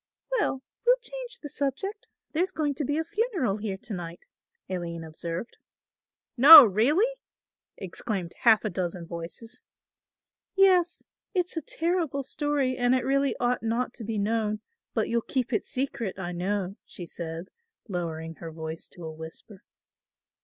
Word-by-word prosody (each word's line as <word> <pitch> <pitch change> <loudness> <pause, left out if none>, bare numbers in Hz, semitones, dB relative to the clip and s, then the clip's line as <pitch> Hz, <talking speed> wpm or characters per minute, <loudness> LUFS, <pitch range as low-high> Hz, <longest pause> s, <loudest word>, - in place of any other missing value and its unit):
"Well, 270 -10 -1 0.2
we'll - - +6
change - - -6
the - - -4
subject; 300 - -3 0.2
there's 350 +4 +1
going 305 -4 0
to 290 - -3
be 290 +2 0
a 320 - +1
funeral 375 - -1
here 205 -2 -3
to 210 - -7
night," 175 -2 -7 0.4
Aline 170 -3 -4
observed. 165 +6 -6 0.8
"No, 290 +2 +12
really?" 240 - +3 0.7
exclaimed 190 -1 -4
half 225 -2 +5
a 215 - -1
dozen 175 -1 -3
voices. 170 +7 -8 0.9
"Yes, 365 -3 +4 0.3
it's 360 -1 0
a 325 - -1
terrible 325 -3 -1
story 280 -2 0
and 245 +1 +3
it 255 - 0
really 275 +1 +2
ought 245 0 +1
not 235 +2 -1
to 230 - -8
be 220 0 -3
known; 215 0 0 0.3
but - - +1
you'll 235 0 +1
keep 255 +1 -2
it - - 0
secret 250 -8 -3
I 180 -2 -4
know," 190 +2 -2
she 175 - -7
said, 165 +1 -6 0.4
lowering 165 -4 -4
her 165 -1 -7
voice 160 0 -7
to 175 -3 -9
a 160 - -5
whisper. 160 +5 -11
230 Hz, 150 wpm, -27 LUFS, 180-290 Hz, 0.9 s, No